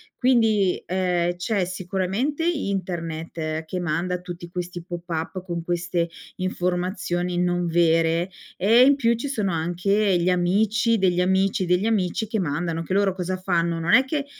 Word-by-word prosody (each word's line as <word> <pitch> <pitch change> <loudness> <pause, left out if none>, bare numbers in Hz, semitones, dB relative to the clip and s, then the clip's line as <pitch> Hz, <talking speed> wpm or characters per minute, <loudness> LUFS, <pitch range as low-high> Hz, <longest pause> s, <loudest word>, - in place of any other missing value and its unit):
Quindi, 225 -7 +2
ehm, 180 -1 0
c'è 195 +2 0
sicuramente 190 - -2
internet, 165 - -3
che 180 +3 -4
manda 175 +2 -1
tutti 175 -1 -8
questi 175 -1 -5
pop-up 175 0 -5
con 170 -2 -4
queste 175 0 -1 0.3
informazioni 180 -1 -2
non 175 0 +1
vere, 165 +1 +2 0.3
e 225 +6 +5
in 280 +2 +6
più 235 -4 +2
ci 235 +5 -4
sono 215 -8 -1
anche 180 +4 +1
gli 175 +2 +1
amici, 210 +6 +2
degli 180 -3 +2
amici, 190 +1 +2
degli 180 +3 +2
amici 215 -1 0
che 220 +1 -2
mandano 165 0 -2
anche 165 +3 -4
loro 195 -1 +2
cosa 185 0 -3
fanno, 170 -2 0
non 165 +1 +1
è 260 - +7
che 280 +1 -2
180 Hz, 150 wpm, -24 LUFS, 175-200 Hz, 0.3 s, è